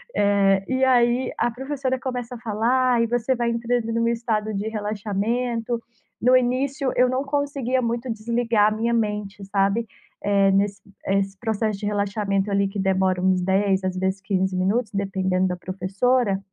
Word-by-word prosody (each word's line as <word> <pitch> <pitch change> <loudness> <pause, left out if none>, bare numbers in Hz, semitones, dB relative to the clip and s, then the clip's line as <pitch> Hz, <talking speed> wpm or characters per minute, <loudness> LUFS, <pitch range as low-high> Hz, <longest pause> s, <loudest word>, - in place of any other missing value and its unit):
eh, 200 -1 +3
e 260 0 +2
aí 245 0 +3
a - - +2
professora 260 +1 -3
começa 250 -2 -4
a - - -7
falar, 235 +3 +1
e 230 - +2
você 245 +2 0
vai 235 0 0
entrando 235 0 -1
num 230 0 +1
estado 225 -2 -1
de 205 +2 -3
relaxamento. 225 +3 -2 0.4
No 255 +2 +6
início, 260 +2 0
eu 250 0 +4
não 260 +2 0
conseguia 275 -3 -1
muito 235 +1 -2
desligar 225 -1 +1
a - - -5
minha 235 +1 0
mente, 210 -3 -2
sabe, 200 +3 +1 0.4
eh, 200 -1 +3
nesse 195 0 +1 0.3
esse 195 0 0
processo 220 -2 -1
de 205 - -5
relaxamento, 200 -1 -1
ali, 200 0 +2
que 195 0 -5
demora 190 -1 +1
uns 185 -1 +2
10, 190 +1 +1
às 185 0 -2
vezes 190 +1 -1
15 190 -1 -1
minutos, 205 +5 0
dependendo 190 -1 0
da 180 -1 -3
professora. 195 +4 0
215 Hz, 165 wpm, -23 LUFS, 195-245 Hz, 0.4 s, No